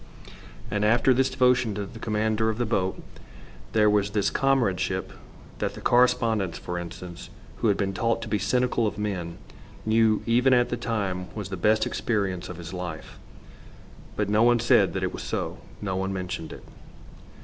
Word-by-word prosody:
And 105 0 0
after 120 +4 +4
this 130 +1 +2
devotion 125 -5 +2
to 100 0 -3
the 115 +3 -11
commander 110 0 0
of 110 - -2
the 120 - 0
boat 95 -4 -1 0.7
there 105 -1 +4
was 105 -1 +3
this 105 -1 0
comradeship 130 -10 0 0.5
that - - -2
the - - -8
correspondent, 115 -7 +2
for 90 0 -4
instance, 85 +1 -8 0.3
who 115 - 0
had 100 - +3
been 95 -1 -1
taught 115 +4 0
to - - -6
be 105 - 0
cynical 125 +2 +1
of - - -4
men, 95 -5 -3 0.5
knew 110 -1 +3
even 125 +3 +4
at 120 0 +3
the - - -1
time 100 -7 -2
was 105 -3 -5
the 95 - -3
best 110 +5 +2
experience 95 -6 -2
of 90 - -7
his 85 +1 -8
life. 90 -4 -6 1.0
But 105 - 0
no 105 +2 +2
one 120 0 +5
said 120 - +4
that - - -2
it - - -1
was - - -6
so. - - -3 0.2
No 95 -2 -2
one 95 +1 -1
mentioned 90 -4 -4
it. - - -10
105 Hz, 180 wpm, -26 LUFS, 95-115 Hz, 1.0 s, one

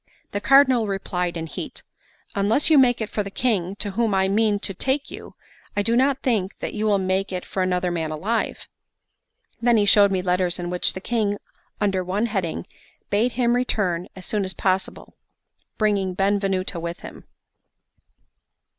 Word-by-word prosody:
The 205 - -3
Cardinal 260 -1 +5
replied 180 -3 -2
in 165 - -4
heat: 160 - -7 0.5
"Unless 215 +10 +2
you 300 - +7
make 245 -3 +4
if 220 - -4
for 210 - -1
the 200 - -5
King, 200 -4 -1
to 205 0 -2
whom 220 0 +1
I 190 0 +3
mean 210 +1 +2
to 195 - -3
take 265 +8 -1
you, - - -10 0.4
I 205 - +2
do 230 +3 +2
not 265 +2 +2
think 215 -6 0
that - - -5
you 215 0 -1
will 205 -1 +3
make 190 +1 -1
it 180 -1 -4
for 190 - -3
another 180 -1 0
man 165 -2 -2
alive." 200 +9 -2 0.9
Then 240 -1 +4
he 205 - +3
showed 200 -1 +6
me 185 -1 0
letters 180 -1 +1
in 175 -1 -4
which 180 - +1
the 190 - -7
King, 210 -2 0 0.4
under 195 -3 +1
one 195 +5 -1
heading, 195 -7 -2 0.5
bade 230 +4 +2
him 240 -1 +2
return 190 -8 0
as 185 - -9
soon 210 -2 -1
as 190 -2 -3
possible, 190 +1 -2 0.6
bringing 200 -4 +1
Benvenuto 195 -2 0
with 170 +1 -5
him. - - -11
200 Hz, 175 wpm, -23 LUFS, 185-225 Hz, 0.9 s, you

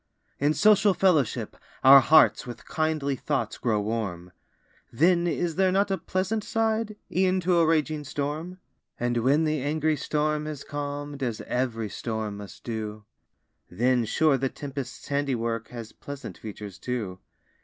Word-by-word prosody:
In 145 +2 +2
social 205 -2 +5
fellowship, 160 - +1 0.3
our 135 +1 +10
hearts 155 0 +5
With 120 - -8
kindly 155 -3 0
thoughts 145 +2 -2
grow 110 -4 +1
warm; 100 -5 -3 0.6
Then 170 +6 +3
is 170 -1 -1
there 190 -1 +3
not 200 +1 +2
a 190 - +1
pleasant 195 +4 -1
side, 220 -1 0 0.2
E'en 185 0 +3
to 175 0 +3
a 165 - +4
raging 155 -1 +1
storm? 150 +6 -4 0.4
And 120 0 0
when 135 +7 +3
the 155 -2 0
angry 155 +2 +1
storm 150 0 -1
has 150 -3 -6
calm'd, 145 -1 -5
As 120 -4 -2
ev'ry 115 -4 -2
storm 110 +1 -4
must 100 -2 -11
do, 110 -2 -5 0.6
Then, 120 +6 +2
sure, 140 +4 +2
the 135 +1 0
tempest's 135 -3 -7
handiwork, 120 -5 -1
Has 115 -2 -8
pleasant 140 -1 -8
features, 105 -2 -9
too. 110 -7 -4
145 Hz, 145 wpm, -26 LUFS, 115-160 Hz, 0.6 s, our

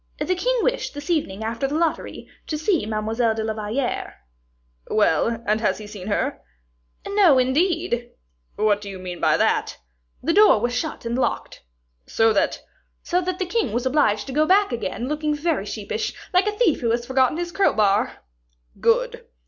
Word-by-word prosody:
"The 365 - 0
king - - 0
wished, - - -1
this 290 +3 -5
evening, 220 - -1
after 230 +4 -2
the 285 - -3
lottery, 330 -1 -2 0.2
to 305 - -2
see 315 - 0
Mademoiselle 220 +1 0
de 220 - -2
la 220 0 -2
Valliere." 220 +5 -3 0.7
"Well, 215 +3 +1
and 215 +1 +1
he 220 - -3
has - - 0
seen 200 -3 -8
her?" 205 - -1 0.7
"No, 390 -9 +5
indeed!" 260 -1 +1 0.5
"What 210 -1 +2
do 200 - -7
you 195 - -7
mean 180 -1 -7
by - - +3
that?" - - +1 0.5
"The 330 - +1
door 415 - +6
was 240 +3 -1
shut 245 -1 -3
and 230 +1 -2
locked." 255 - -2 0.5
"So 225 0 +3
that 200 - 0 0.2
" - - -46
"So 360 +1 0
that 365 0 -3
the 370 - -1
king 355 - -1
was 240 +2 -1
obliged 255 -7 +2
to 270 - -7
go 305 +2 +2
back 400 -1 +4
again, 240 0 -3
looking 300 +1 -1
very 325 +3 -1
sheepish, - - -4 0.2
like 365 +3 +4
a - - +2
thief 405 -11 +2
who 235 - 0
has 235 +1 0
forgotten 260 +3 +2
his 345 0 -3
crowbar." 210 - +1 0.6
"Good." - - +1
260 Hz, 180 wpm, -23 LUFS, 220-340 Hz, 0.7 s, door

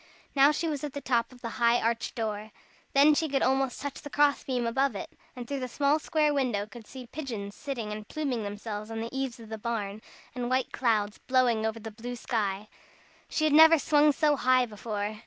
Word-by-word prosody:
Now 280 +1 +6
she 315 +2 -2
was 295 -3 -3
at 295 -3 -4
the 285 - -4
top 240 -4 0
of 250 -1 -16
the 230 - -3
high 235 +1 +5
arched 230 0 -1
door. 215 -2 -3 0.4
Then 285 +2 +6
she 315 +1 0
could 275 0 +1
almost 265 0 +1
touch 285 -1 -5
the 290 - -8
cross 290 0 +2
beam 250 -3 -1
above 265 +1 +1
it, 195 - -6 0.2
and 245 -2 -7
through 280 +1 -3
the 255 - -3
small 285 +4 +2
square 305 -1 +1
window 245 -8 0
could 220 0 -13
see 260 -2 -9
pigeons 230 -8 -6
sitting 240 -7 -5
and 210 0 -6
pluming 275 -7 -2
themselves 210 +1 -5
on 225 0 -4
the 230 +3 -5
eaves 265 -2 -3
of 225 -2 -12
the 220 -1 -6
barn, 215 -2 -3 0.3
and 245 -1 -3
white 255 0 0
clouds 215 -4 0
blowing 245 -4 +2
over 220 +1 -4
the 225 0 -7
blue 240 +3 -6
sky. 210 -4 -2 0.6
She 310 - -1
had 310 -1 +3
never 320 +2 +8
swung 295 +1 +4
so 295 0 +2
high 255 0 +4
before. 210 -1 -4
245 Hz, 215 wpm, -28 LUFS, 220-280 Hz, 0.6 s, never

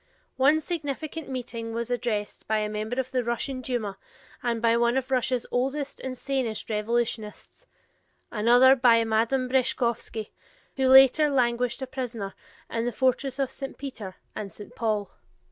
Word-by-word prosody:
One 285 +4 +4
significant 315 -1 -4
meeting 230 -3 -5
was 235 +1 -3
addressed 225 -4 -2
by 220 - +2
a 210 0 -1
member 215 +4 -3
of 260 -1 -2
the 255 -1 0
Russian 245 +3 -2
Duma 230 -6 -3 0.4
and 235 -2 -1
by 230 0 +3
one 235 +2 +2
of 265 0 -2
Russia's 250 -1 +1
oldest 270 +3 -1
and 255 -1 -5
sanest 250 -5 -2
revolutionists; 225 - -2 0.6
another 245 +4 +6
by 235 -3 +5
Madame 230 +4 +1
Breshkovsky, 235 -4 0 0.4
who 265 -1 +2
later 270 +3 +7
languished 250 -1 +1
a - - -1
prisoner 245 -6 -5 0.3
in 230 0 -2
the 245 - 0
fortress 260 +2 0
of 270 -2 -1
St. 270 - -6
Peter 225 -9 -7 0.2
and 200 -2 -5
St. 205 - -11
Paul. 215 -3 -1
245 Hz, 150 wpm, -26 LUFS, 225-265 Hz, 0.6 s, later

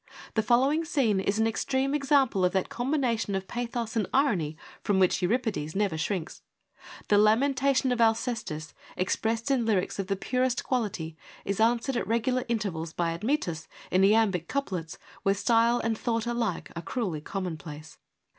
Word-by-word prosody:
The 220 - +2
following 265 +8 +3
scene 265 - +1
is 200 +2 0
an 220 - +3
extreme 265 +4 0
example 275 -8 +2
of 180 - +2
that 190 -1 0
combination 240 -5 0
of 190 0 -3
pathos 235 -1 -3
and 220 - +1
irony 190 - +1 0.2
from 205 - +1
which 185 0 +3
Euripides 195 -6 -1
never 200 -4 +1
shrinks. 165 +2 -3 0.7
The 205 - +5
lamentation 260 +4 +3
of 245 -1 +1
Alcestis, 225 - 0 0.2
expressed 225 +6 0
in 260 -3 +2
lyrics 200 -4 0
of 195 - -2
the 195 - 0
purest 250 +5 0
quality, 195 -10 -2 0.3
is 200 0 -2
answered 235 +3 +2
at - - -2
regular 245 +3 0
intervals 190 -9 -2
by 170 -1 0
Admetus 175 - -2 0.2
in 185 - +3
iambic 195 -5 +3
couplets 185 - -3 0.2
where 195 0 +2
style 230 +3 +3
and 230 -1 0
thought 230 0 -1
alike 235 -6 -2
are 170 - -4
cruelly 180 - -3
common 185 0 -4
place. 155 0 -10
220 Hz, 160 wpm, -28 LUFS, 185-245 Hz, 0.7 s, The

